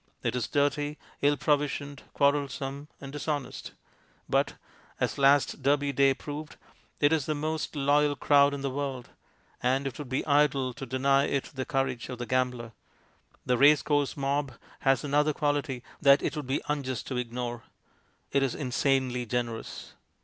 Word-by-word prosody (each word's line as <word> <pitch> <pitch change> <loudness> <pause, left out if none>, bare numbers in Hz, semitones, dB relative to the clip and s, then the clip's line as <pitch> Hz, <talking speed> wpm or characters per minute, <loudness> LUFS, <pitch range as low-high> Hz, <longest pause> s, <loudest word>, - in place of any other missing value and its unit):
It - - 0
is 120 -3 -1
dirty, 145 +1 0 0.2
ill 145 0 +3
provisioned, 145 -1 -1
quarrelsome, 140 0 0
and 135 -1 -8
dishonest. 145 -2 -4 0.5
But, - - +1 0.4
as - - -1
last 140 +1 +4
Derby 140 +1 +2
Day 135 0 +4
proved, 150 +2 -7 0.4
it 145 +1 +4
is 155 -4 0
the 155 - 0
most 155 +2 -3
loyal 145 +1 +3
crowd 140 0 +4
in 140 - -6
the 135 -1 -2
world, 135 -3 -4 0.5
and 130 +2 +1
it 135 -1 -4
would 145 -4 -6
be 130 - -1
idle 140 -3 +2
to 135 +1 -8
deny 135 +2 +2
it 140 -2 -2
the 130 -1 -3
courage 130 -3 -1
of 125 - -5
the 120 - -4
gambler. 125 -2 -1 0.7
The 125 -1 +1
race 145 +1 +6
course 145 -2 0
mob 140 -1 -1 0.3
has 135 +2 +2
another 150 +1 +2
quality 145 -4 -1 0.2
that 140 0 +6
it - - -1
would 150 -4 -5
be 135 - -1
unjust 140 -4 -2
to 130 - -2
ignore; 120 -1 -4 0.7
it 140 - +2
is 135 -3 0
insanely 130 -2 0
generous. 120 -1 -4
140 Hz, 160 wpm, -28 LUFS, 130-145 Hz, 0.7 s, race